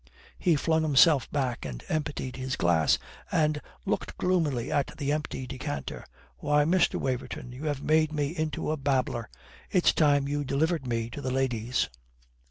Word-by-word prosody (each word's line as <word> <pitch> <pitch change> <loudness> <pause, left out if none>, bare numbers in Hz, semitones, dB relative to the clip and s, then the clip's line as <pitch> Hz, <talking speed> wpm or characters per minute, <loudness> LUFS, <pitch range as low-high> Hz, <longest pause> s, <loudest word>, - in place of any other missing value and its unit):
He 175 -4 +3
flung 160 +2 +2
himself 150 -2 +5
back 130 -5 -1
and 60 -4 -6
emptied 150 -4 -2
his 130 0 -3
glass, 85 -3 +3 0.3
and 150 -1 +2 0.2
looked - - -2
gloomily 160 -10 0
at 140 - 0
the 145 -2 -1
empty 150 -3 -2
decanter. 75 - -5 0.3
"Why, 150 - +2
Mr. 180 +3 +3
Waverton, 125 -1 -3
you 130 +5 -7
have 145 -2 -2
made 155 0 +3
me 150 +1 -1
into 155 -1 -2
a 155 - -1
babbler. 130 -5 0 0.4
It's 180 - +4
time 145 -3 +3
you 145 0 -1
delivered 140 +2 0
me 115 -1 -2
to 145 - -6
the 130 - -2
ladies." 125 -2 0
140 Hz, 160 wpm, -28 LUFS, 130-155 Hz, 0.4 s, himself